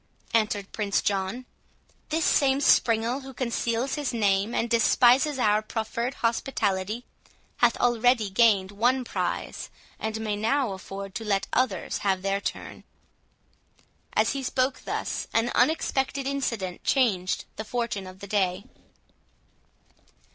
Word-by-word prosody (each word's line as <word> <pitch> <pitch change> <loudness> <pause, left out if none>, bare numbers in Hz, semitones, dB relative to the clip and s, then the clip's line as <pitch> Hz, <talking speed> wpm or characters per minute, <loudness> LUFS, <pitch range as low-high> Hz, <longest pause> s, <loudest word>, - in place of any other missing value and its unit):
answered 210 -3 0
Prince 205 -2 0
John; 200 +5 -1 0.6
"this 320 +1 0
same 270 -1 +3
springald, 235 -1 +3
who 265 -1 -10
conceals 235 +1 -1
his 290 -3 -2
name, 205 -2 +1
and 230 - +1
despises 245 +4 +4
our 210 -3 +3
proffered 230 +3 -3
hospitality, 220 -2 -1 0.5
hath 240 -3 +3
already 240 -3 +2
gained 200 -2 +4
one 245 +5 +1
prize, - - -3 0.3
and 220 0 -3
may 215 -2 -2
now 225 +3 +1
afford 195 +1 -7
to 225 - -5
let 200 -2 0
others 255 0 0
have 190 -2 0
their 195 0 0
turn." - - -6 1.3
As - - +2
he 275 - -3
spoke 255 0 -1
thus, - - -3
an 230 +1 +2
unexpected 270 0 +1
incident 230 -10 -3
changed 200 -9 +1
the 220 - -3
fortune 220 -4 -3
of 185 +1 -12
the 200 - -7
day. 190 -2 0
225 Hz, 125 wpm, -26 LUFS, 200-255 Hz, 1.3 s, despises